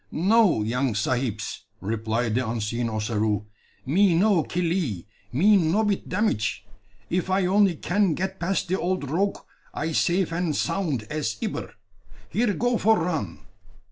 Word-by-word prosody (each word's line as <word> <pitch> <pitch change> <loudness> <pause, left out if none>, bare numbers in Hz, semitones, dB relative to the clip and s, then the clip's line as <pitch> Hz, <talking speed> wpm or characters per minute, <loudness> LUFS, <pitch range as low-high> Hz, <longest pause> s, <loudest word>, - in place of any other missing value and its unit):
"No, 195 - +3
young 125 +1 0
sahibs," 110 0 -2 0.2
replied 110 +2 -1
the 125 -1 0
unseen 115 +1 -2
Ossaroo; 105 -1 -1 0.4
"me 175 +6 +3
no 190 0 +4
killee, 165 - -2 0.3
me 200 - +5
no 180 +5 +2
bit 205 -2 -1
damage. 110 - 0 0.5
If 180 +1 0
I 190 0 +2
only 195 -1 +3
can 180 +1 +1
get 190 +3 -3
pass 185 +3 0
de 185 +2 -1
old 175 -6 -2
rogue, 195 +5 +1 0.4
I 155 +2 -2
safe 175 +3 +1
and 170 -3 -1
sound 155 - -1
as 145 -8 -2
ibber. - - -4 0.6
Here 220 +5 +2
go 245 -1 +1
for 220 +1 +4
run!" 155 - -3
165 Hz, 140 wpm, -25 LUFS, 115-190 Hz, 0.6 s, me